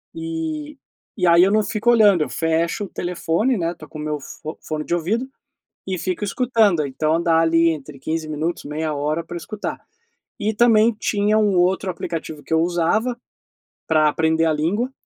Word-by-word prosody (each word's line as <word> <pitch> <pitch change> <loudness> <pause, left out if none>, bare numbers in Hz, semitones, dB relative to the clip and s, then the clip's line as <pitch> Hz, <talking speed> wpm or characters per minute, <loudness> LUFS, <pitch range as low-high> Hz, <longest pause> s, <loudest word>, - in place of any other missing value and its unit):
e 320 -2 -4 0.4
e 180 - +1
aí 170 +1 +7
eu 195 - +3
não 215 +1 +4
fico 225 +3 +1
olhando. 205 -7 +5
Eu - - -6
fecho 165 +4 0
o - - -11
telefone, 180 +8 -1
né, 165 0 0
estou 155 -3 -13
com 155 - -9
meu 150 0 -3
fo 155 +3 -9
fone 155 -1 -4
de 175 - 0
ouvido 215 +10 -1 0.6
e 185 - -2
fico 185 +2 -3
escutando, 215 -6 +2
então 155 +4 0
dá 165 -1 +3
ali 165 0 +4
entre 150 -3 -6
15 160 +2 -3
minutos, 155 +3 -3
meia 155 +2 -3
hora 150 +3 -1
para 175 +1 -7
escutar. 210 +4 -5 0.6
E 215 +1 0
também 225 0 +5
tinha 210 0 +1
um 205 -3 +2
outro 185 +2 +2
aplicativo 160 -3 -5
que 160 - -2
eu 160 - +4
usava 180 +8 0 0.7
para 155 -1 +4
aprender 160 +1 +1
a 160 - +2
língua 195 - -1
170 Hz, 180 wpm, -21 LUFS, 160-215 Hz, 0.7 s, aí